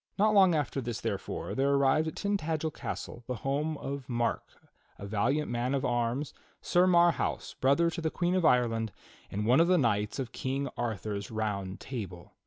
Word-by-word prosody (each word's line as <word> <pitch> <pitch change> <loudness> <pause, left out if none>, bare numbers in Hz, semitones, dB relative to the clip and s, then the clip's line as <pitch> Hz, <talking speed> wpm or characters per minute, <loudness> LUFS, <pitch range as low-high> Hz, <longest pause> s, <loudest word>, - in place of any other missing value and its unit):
Not 215 +2 +4
long 190 -4 +6
after 145 -2 -1
this, 120 -2 -4
therefore, - - -4
there 135 +1 +1
arrived 140 +3 +3
at 160 - -4
Tin 205 0 0
tagel 160 -3 -1
castle, 120 - -6
the 125 - -2
home 150 +3 0
of 140 -2 -6
Mark, 120 -1 0 0.6
a 100 - -8
valiant 120 +9 0
man 120 +3 0
of 135 - -1
arms. 120 +4 -1 0.3
Sir 180 +1 +3
Marhaus, 175 -1 +2
brother 140 +6 +4
to 170 - -5
the 160 - 0
Queen 175 +2 0
of 185 -1 +1
Ireland, 115 -5 +2 0.4
and 105 +2 -3
one 125 +5 +5
of 165 - +5
the 180 0 +4
knights 105 -7 +1
of 130 -4 -4
King 135 +2 -2
Arthur's 105 -3 -3
Round 100 -4 -3
Table. 95 -9 -7
135 Hz, 185 wpm, -30 LUFS, 115-160 Hz, 0.6 s, long